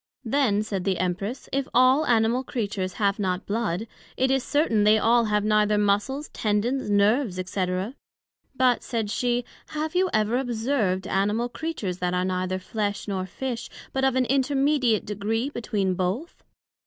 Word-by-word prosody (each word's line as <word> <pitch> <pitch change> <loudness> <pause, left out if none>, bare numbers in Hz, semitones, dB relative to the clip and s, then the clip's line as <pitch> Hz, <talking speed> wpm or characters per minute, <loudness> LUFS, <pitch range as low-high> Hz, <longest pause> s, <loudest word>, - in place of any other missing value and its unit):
Then 225 -5 +2
said 195 -4 -3
the 190 -1 0
Empress, 185 +7 -3
If 275 -1 0
all 255 +4 +5
Animal 235 +2 +2
Creatures 200 -7 -3
have 200 -1 0
not 185 -2 -1
blood, 210 -2 -1 0.3
it 260 +1 +2
is 270 -1 +2
certain, 290 -9 +2
they 210 +1 +6
all 230 +2 +3
have 210 -1 +1
neither 210 0 +3
Muscles, 210 +8 0
tendons, 220 +4 -1
nerves, 205 0 +2
&c. 190 -1 -1 0.9
But, 255 -2 +3
said 225 -4 -3
she, 245 +1 0 0.2
Have 310 +1 -3
you 370 +1 +2
ever 215 +2 +1
observed 225 -6 0
Animal 210 +5 0
Creatures 235 - -4
that 180 0 0
are 180 0 +1
neither 185 0 -1
flesh, 205 +2 -3
nor 190 -2 -2
Fish, 245 +4 -5 0.2
but 265 - -1
of 265 -1 +3
an 260 -1 +2
intermediate 270 -3 +2
degree 220 +6 -2
between 205 -7 -1
both? 190 - -3
220 Hz, 155 wpm, -25 LUFS, 200-255 Hz, 0.9 s, they